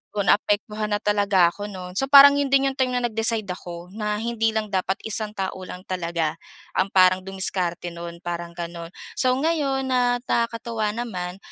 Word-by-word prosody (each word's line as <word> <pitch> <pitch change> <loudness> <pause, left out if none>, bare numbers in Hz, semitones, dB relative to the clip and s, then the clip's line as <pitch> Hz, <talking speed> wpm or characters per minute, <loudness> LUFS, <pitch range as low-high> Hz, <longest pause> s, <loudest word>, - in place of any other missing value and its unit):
kung 205 -1 0
naapektuhan 210 +1 -1
na 205 - +2
talaga 200 -4 +3
ako 205 0 -6
no'n. 180 -2 -8
So, 270 +8 -1
parang 280 0 +10
'yon 280 - 0
din 275 0 +4
yung - - -11
time 260 -1 +2
na 245 - 0
nag-decide 225 -1 0
ako 175 0 -10
na 210 -1 -2
hindi 225 0 0
lang 215 -1 0
dapat 190 +1 0
isang 215 0 -1
tao 190 -1 -2
lang 180 +1 -9
talaga 170 -3 -2 0.4
ang 190 - +1
parang 185 0 +5
dumiskarte 185 -2 -2
no'n 170 0 -8
parang 170 0 -4
gano'n. 170 -1 -6 0.2
So, 255 - +2
ngayon 280 -3 0
na 245 -1 +2
nakakatuwa 230 -2 -1
naman 185 -7 -4
205 Hz, 175 wpm, -23 LUFS, 180-235 Hz, 0.4 s, parang